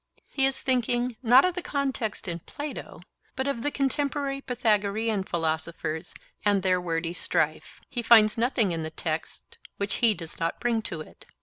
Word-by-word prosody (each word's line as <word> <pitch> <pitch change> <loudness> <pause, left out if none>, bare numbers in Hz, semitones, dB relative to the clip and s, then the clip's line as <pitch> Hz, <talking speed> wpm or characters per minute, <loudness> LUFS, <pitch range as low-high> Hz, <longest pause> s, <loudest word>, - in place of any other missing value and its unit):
He 270 -1 +3
is 270 - -1
thinking, 245 -1 +1
not 255 +4 +7
of 365 - +1
the 360 - -3
context 270 - -2
in 170 -1 -3
Plato, 290 - -7 0.3
but 265 - -1
of 275 -5 -1
the 290 - 0
contemporary 280 0 -1
Pythagorean 220 -4 +1
philosophers 160 -1 -2 0.3
and 205 -2 +3
their 185 -1 +2
wordy 165 -1 -2
strife. - - -1
He 245 - -3
finds 220 -2 +6
nothing 230 -4 +2
in 165 -1 -2
the 160 - -3
text 160 0 -5 0.2
which 200 0 -2
he 225 -3 +4
does 165 -2 -9
not 165 0 -1
bring 235 -2 +1
to 185 -7 -5
it. - - -14
220 Hz, 170 wpm, -27 LUFS, 175-265 Hz, 0.3 s, not